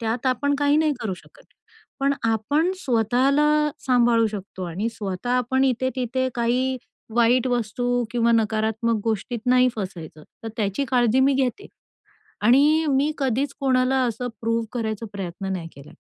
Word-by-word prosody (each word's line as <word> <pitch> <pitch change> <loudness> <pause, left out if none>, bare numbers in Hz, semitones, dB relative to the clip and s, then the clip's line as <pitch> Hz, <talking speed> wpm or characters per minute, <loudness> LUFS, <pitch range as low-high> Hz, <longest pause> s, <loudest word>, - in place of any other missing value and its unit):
त्यात 230 +3 -2
आपण 285 +3 +1
काही 290 0 +3
नाही 310 -1 +2
करू 210 -5 -2
शकत. - - -19 0.6
पण 275 +1 +2
आपण 230 - +1
स्वतःला 260 - +2 0.4
सांभाळू 240 -3 +4
शकतो 200 -3 -7
आणि 180 +6 -3
स्वतः 205 +1 -5
आपण 250 +2 +1
इथे 260 0 +1
तिथे 260 +1 -1
काही 250 +2 0 0.4
वाईट 240 +2 +3
वस्तू 245 +1 -1
किंवा 235 0 +2
नकारात्मक 220 0 0
गोष्टीत 225 +2 -2
नाही 250 0 +5
फसायचं 175 -7 -7 0.2
तर 225 - -5
त्याची 210 +4 -1
काळजी 245 0 +3
मी 275 +1 +4
घेते. 265 +9 -1 0.8
आणि 285 +8 +4
मी 275 +2 +2
कधीच 270 +1 0
कोणाला 260 -1 +2
असं 245 +1 -2
प्रूव्ह 230 0 0
करायचा 225 -2 -3
प्रयत्न 195 0 -5
नाही 170 -3 -4
केला. 140 +1 -13
240 Hz, 145 wpm, -23 LUFS, 220-260 Hz, 0.8 s, नाही